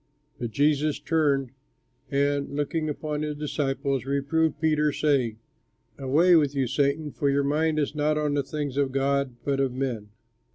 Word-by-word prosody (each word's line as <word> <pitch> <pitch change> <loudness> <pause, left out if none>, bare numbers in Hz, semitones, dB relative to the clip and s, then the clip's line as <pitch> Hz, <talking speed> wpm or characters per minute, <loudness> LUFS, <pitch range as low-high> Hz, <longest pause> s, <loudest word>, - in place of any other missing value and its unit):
But 120 - -3
Jesus 145 +3 +1
turned 140 -5 +1 0.6
and, 140 0 0
looking 155 +2 -1
upon 150 0 -3
his 150 -1 -2
disciples, 140 -2 -1
reproved 140 +4 0
Peter, 150 -1 +2
saying, 135 -7 +1 0.6
"Away 155 +7 +4
with 145 -3 +3
you, 135 -1 +1
Satan, 140 +4 0
for 140 - 0
your 140 0 +2
mind 155 +2 +1
is 145 -1 0
not 150 0 +1
on 150 -1 0
the 145 - +2
things 145 -1 -4
of 140 -2 +1
God 135 -1 0
but 140 -1 0
of 135 -2 +1
men." 125 -5 -3
145 Hz, 160 wpm, -26 LUFS, 135-150 Hz, 0.6 s, Away